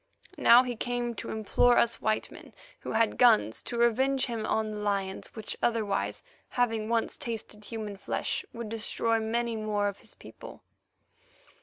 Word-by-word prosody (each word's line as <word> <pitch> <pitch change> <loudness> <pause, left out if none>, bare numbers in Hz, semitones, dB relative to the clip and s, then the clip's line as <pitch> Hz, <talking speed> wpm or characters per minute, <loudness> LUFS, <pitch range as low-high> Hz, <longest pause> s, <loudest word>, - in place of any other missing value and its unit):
Now 240 +2 +7
he 250 -1 -3
came 240 +1 -2
to - - -5
implore 220 +3 +3
us 235 0 +2
white 215 0 0
men - - -13 0.3
who - - -6
had 225 -1 +1
guns 110 - +5
to 240 - -5
revenge 260 +3 +2
him 230 -3 -3
on 220 -1 0
the 210 - -5
lions, 200 -2 -3
which 220 -1 -4
otherwise, 220 -4 0 0.3
having 225 -3 0
once 230 -1 0
tasted 215 -2 -6
human 215 -2 -6
flesh, - - -2
would 230 -2 -6
destroy 225 +1 0
many 230 +1 -1
more 210 -2 0
of 200 - -4
his - - -13
people. - - -12
225 Hz, 160 wpm, -29 LUFS, 215-235 Hz, 0.3 s, Now